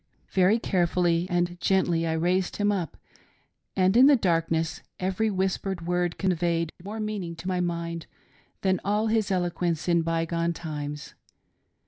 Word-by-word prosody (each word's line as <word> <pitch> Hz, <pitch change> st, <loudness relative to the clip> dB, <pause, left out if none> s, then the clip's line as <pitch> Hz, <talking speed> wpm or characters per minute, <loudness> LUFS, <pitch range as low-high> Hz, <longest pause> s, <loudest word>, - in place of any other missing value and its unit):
" -, -, -40 dB
Very 190 Hz, +4 st, +4 dB
carefully 175 Hz, -4 st, +1 dB
and 175 Hz, 0 st, 0 dB
gently 175 Hz, -4 st, +2 dB
I 160 Hz, -, 0 dB
raised 175 Hz, +3 st, 0 dB
him 205 Hz, 0 st, +1 dB
up, 180 Hz, -7 st, -3 dB, 0.8 s
and, 190 Hz, +2 st, +3 dB
in 255 Hz, +3 st, +8 dB
the 290 Hz, -, +7 dB
darkness, 165 Hz, -, 0 dB, 0.2 s
every 190 Hz, +4 st, 0 dB
whispered 190 Hz, -2 st, -2 dB
word 175 Hz, 0 st, 0 dB
conveyed 170 Hz, -3 st, 0 dB
more 210 Hz, +3 st, -6 dB
meaning 205 Hz, -6 st, -3 dB
to 165 Hz, +2 st, -8 dB
my 185 Hz, -1 st, 0 dB
mind 170 Hz, -1 st, -3 dB, 0.5 s
than 190 Hz, -2 st, +2 dB
all 210 Hz, +2 st, +1 dB
his 220 Hz, -2 st, +1 dB
eloquence 175 Hz, -3 st, -1 dB
in 170 Hz, -1 st, +3 dB
by 165 Hz, 0 st, 0 dB
gone 170 Hz, +1 st, -1 dB
times. 150 Hz, -3 st, -6 dB
175 Hz, 150 wpm, -26 LUFS, 165-190 Hz, 0.8 s, in